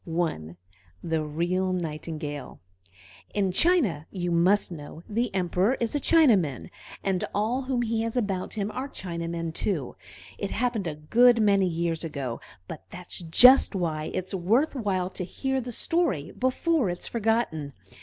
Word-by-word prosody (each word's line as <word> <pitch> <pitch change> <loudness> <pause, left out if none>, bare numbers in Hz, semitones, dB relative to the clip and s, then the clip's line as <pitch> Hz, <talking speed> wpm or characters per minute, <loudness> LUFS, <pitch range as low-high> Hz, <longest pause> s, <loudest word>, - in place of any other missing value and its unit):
I 160 - -2 0.5
THE 160 -2 -1
REAL 175 +5 -1
NIGHTINGALE 155 -4 -5 0.8
In 195 -3 +1
China, 205 - +2
you 175 -2 -3
must 180 +4 +3
know, 155 0 -9
the 230 +2 -1
Emperor 185 +6 +1
is 230 -2 -1
a 290 - +1
Chinaman, 225 - +3 0.3
and 190 -2 0
all 220 +6 0
whom 255 -2 0
he 225 -1 -1
has 230 +2 -2
about 195 -6 -2
him 210 0 -2
are 265 +2 -4
Chinamen 170 -5 -4
too. 160 -8 -2 0.4
It 200 - -2
happened 230 -5 -1
a 155 - -3
good 235 +11 +4
many 200 -3 +4
years 165 -1 -1
ago, 140 -7 -4 0.3
but 160 - -8
that's 180 0 -6
just 225 +9 +6
why 160 -4 -1
it's 185 +2 -3
worth 220 - +2
while 190 -8 -1
to 185 - -4
hear 265 +8 -2
the 245 0 -6
story 280 - 0
before 260 - +1
it 175 - -3
is - - -5
forgotten. 220 - -1
185 Hz, 155 wpm, -26 LUFS, 165-230 Hz, 0.8 s, just